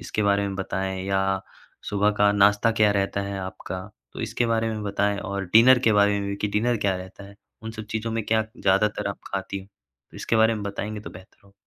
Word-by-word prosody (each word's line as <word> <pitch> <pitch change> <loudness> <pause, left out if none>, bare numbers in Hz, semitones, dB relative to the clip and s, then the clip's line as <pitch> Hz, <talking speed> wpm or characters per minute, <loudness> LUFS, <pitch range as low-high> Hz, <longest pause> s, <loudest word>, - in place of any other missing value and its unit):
इसके 105 - -2
बारे 100 0 +2
में 100 - -4
बताएँ 95 -1 -3
या 95 -1 +1 0.7
सुबह 105 +1 +2
का 100 0 +5
नाश्ता 105 +2 +4
क्या 105 - +6
रहता 100 0 0
है 100 0 -4
आपका 95 0 -6 0.3
तो - - -7
इसके 120 - -1
बारे 115 0 +1
में 110 -1 -4
बताएँ 100 0 0
और 100 0 -4
डिनर 120 +3 +8
के 110 - +4
बारे 100 0 +4
में 100 - -3
भी 100 - -3
कि 105 - -2
डिनर 115 +4 +1
क्या 95 - +2
रहता 95 +2 -10
है। 100 - -13 0.3
उन 110 - -5
सब 110 -1 -7
चीज़ों 110 +1 -2
में 115 -2 -2
क्या 110 0 +2
ज़्यादातर 100 +2 +1
आप 100 - -5
ख़ाती 100 0 -3
हो? 95 - -12 0.5
इसके 115 - -1
बारे 110 +1 +4
में 105 - -5
बताएँगे 105 +1 -4
तो - - -9
बेहतर 95 +1 -15
होगा। 100 - -21
100 Hz, 225 wpm, -24 LUFS, 100-110 Hz, 0.7 s, डिनर